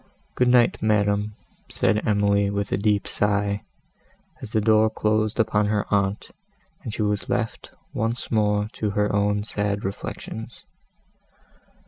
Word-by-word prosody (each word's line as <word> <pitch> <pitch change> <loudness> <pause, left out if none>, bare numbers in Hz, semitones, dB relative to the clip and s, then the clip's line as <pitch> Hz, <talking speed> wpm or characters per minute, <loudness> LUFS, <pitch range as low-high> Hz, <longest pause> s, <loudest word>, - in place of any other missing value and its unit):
"Good 125 - +2
night, 125 -1 +4
madam," 105 -1 +1 0.3
said 105 - +2
Emily, 100 -1 +2
with 100 0 -2
a - - +3
deep 105 0 +1
sigh, 100 0 0 0.8
as - - -8
the 110 - +2
door 110 0 +4
closed 110 +1 0
upon 105 -2 +2
her 105 -1 0
aunt, 100 0 0 0.5
and 115 - -5
she 110 - -2
was 105 -1 -1
left 115 -2 -2 0.2
once 115 +3 -2
more 105 -2 +2
to 105 - -2
her 105 -1 +1
own 105 0 +1
sad 105 -2 -2
reflections. 110 +3 -6
105 Hz, 135 wpm, -24 LUFS, 100-110 Hz, 0.8 s, night